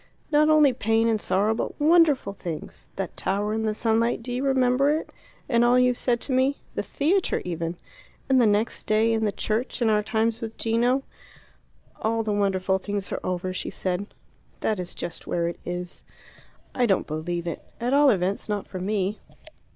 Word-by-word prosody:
"Not 305 +1 +4
only 300 -4 +5
pain 225 -1 +1
and 220 -2 +1
sorrow, 200 +4 +2
but 225 - -4
wonderful 300 - +4
things: 160 -6 -7
that 195 -2 -4
tower 205 +2 0
in 220 - -1
the 215 -1 0
sunlight 230 +1 +1
do 245 - -6
you 250 +2 -2
remember 265 0 +3
it, 310 +2 -1 0.4
and 235 -2 +3
all 240 +1 +5
you 250 0 +4
said 240 0 0
to - - -4
me? 260 +2 +2 0.2
The - - -1
theatre, 345 +6 0
even. 170 -1 -3 0.5
And 265 -1 +4
the 230 - +5
next 210 +2 0
day 220 +1 +3
in 220 -1 +1
the 210 - +1
church; 220 +5 -2
and 230 -3 +3
our 210 0 +3
times 225 +2 0
with 225 -1 -6
Gino." 240 +4 +1 1.0
"All 225 +1 0
the 215 -1 -1
wonderful 190 -2 +1
things 200 0 -4
are - - -2
over," 185 0 -2
she - - -4
said. 185 +2 -3 0.5
"That 215 -3 0
is 180 -1 -6
just 170 - -6
where 170 -1 0
it 170 - -5
is." 180 0 -5 0.7
"I 245 -1 +2
don't 195 - +2
believe 170 +3 -3
it. 170 - -4 0.2
At 245 +3 -1
all 285 0 +6
events 195 -1 0
not 205 -1 -2
for 185 - -7
me. 200 +1 -1
220 Hz, 190 wpm, -25 LUFS, 190-250 Hz, 1.0 s, all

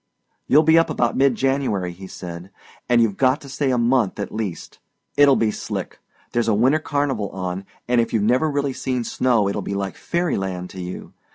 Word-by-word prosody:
"You'll 150 +3 +6
be 160 +1 +6
up 165 - +1
about 120 -1 0
mid 135 -2 +3
January," 130 -9 0
he 95 +2 -10
said, 85 0 -8 0.4
"and 120 -1 +5
you've 105 -4 -1
got 130 +2 +3
to 140 - -11
stay 140 0 -1
a 125 - +2
month 120 -4 +1
at 100 - -4
least. 110 -6 -5 0.4
It'll 145 -1 +6
be 110 -3 +1
slick. - - -5 0.3
There's 120 -1 0
a 110 - +3
winter 130 +8 +3
carnival 140 - -1
on, 95 0 -4 0.2
and 120 -1 +3
if 115 - -2
you've 110 -3 +1
never 125 +8 +2
really 140 -2 -1
seen 125 -1 -2
snow 115 -3 +1
it'll 100 +1 -2
be 100 - -4
like 100 -1 -3
fairy 170 0 -1
land 90 -2 -4
to 95 - -7
you. 90 +1 -7
120 Hz, 205 wpm, -22 LUFS, 100-135 Hz, 0.4 s, You'll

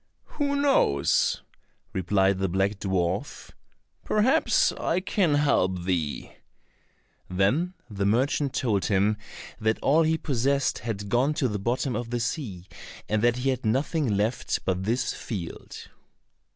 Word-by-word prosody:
"Who 285 -1 0
knows?" 270 - +2 0.5
replied 95 +1 +2
the 95 -1 0
black 95 +3 0
dwarf. 95 -2 -2 0.5
"Perhaps, 255 +10 +3
I 170 - -1
can 185 -4 +1
help 95 -11 +1
thee." 85 -5 -2 0.9
Then 125 - +1
the 100 -2 -2
merchant 135 +5 +1
told 105 -6 0
him 100 +1 +2 0.4
that 110 0 +1
all 155 +4 +4
he 160 0 +2
possessed 140 -1 0
had 100 -3 -4
gone 130 +7 +2
to 135 - +1
the 105 -3 -3
bottom 120 +5 -1
of 120 -1 -4
the 120 0 -2
sea, 115 - -4 0.4
and 110 0 0
that 120 +1 +3
he 130 +2 0
had 130 -1 -4
nothing 130 0 0
left 110 +4 -1
but 95 0 -1
this 120 +4 0
field. 90 -7 -7
115 Hz, 135 wpm, -26 LUFS, 95-140 Hz, 0.9 s, all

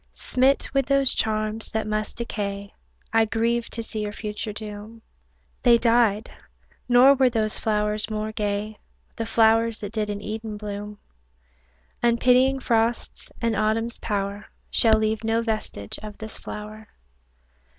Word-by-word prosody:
Smit 260 +2 +1
with 275 -2 +1
those 275 -1 +3
charms, 215 0 -1
that 220 0 -1
must 215 0 -3
decay, 200 -3 -4 0.4
I 225 0 +5
grieve 230 +2 0
to 230 - +1
see 220 -1 -6
your 210 0 -3
future 210 0 -4
doom; 215 +1 -9 0.6
They 240 -2 +6
died 230 -2 +2 0.6
nor 250 +3 +7
were 265 -2 +3
those 220 -3 0
flowers 210 -1 0
more 215 0 -3
gay, 210 0 -3 0.4
The 225 - -3
flowers 225 0 +3
that 205 -1 -5
did 215 -2 -1
in 205 -1 -3
Eden 215 0 -5
bloom; 205 0 -6 1.0
Unpitying 250 +3 +4
frosts 230 -2 -1
and 230 -1 +1
Autumn's 220 +2 0
power 200 -1 -3 0.2
Shall 220 -2 +5
leave 220 0 -1
no 225 +1 +1
vestige 215 - -4
of 210 -1 -9
this 220 0 -7
flower. 215 +1 -8
220 Hz, 140 wpm, -24 LUFS, 210-230 Hz, 1.0 s, nor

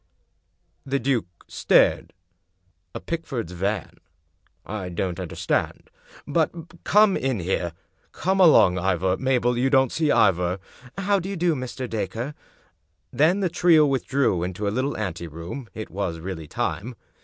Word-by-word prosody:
" - - -46
The - - +4
duke 130 -7 0 0.2
stared. - - +2 0.4
" 90 -1 -37
A - - -3
Pickford's 135 - -4
van? 95 +1 -3 0.7
I 95 -3 -5
don't 90 +1 -3
understand. 90 -3 -2 0.3
But 165 +3 -2
come 210 -1 +5
in 130 -5 -1
here. 85 -1 -2 0.4
Come 190 +1 -1
along, 125 - +6
Ivor. 95 0 +1
Mabel, 125 -2 +1
you 130 +2 +2
don't 130 -2 +3
see 160 -2 0
Ivor." 90 +1 +3 0.4
"How 200 +1 +1
do 185 +2 -5
you 200 - -4
do, 170 0 +2
Mr. 130 -1 -5
Dacre?" 115 +4 -3 0.8
Then 175 +7 +3
the 190 - +2
trio 165 -2 +5
withdrew 135 -8 +1
into 95 +3 -3
a 100 - -1
little 130 +4 -1
anteroom; 85 - -6
it 110 - -7
was 95 -4 -3
really 80 -2 -6
time. 115 - -3
120 Hz, 145 wpm, -24 LUFS, 90-150 Hz, 0.8 s, along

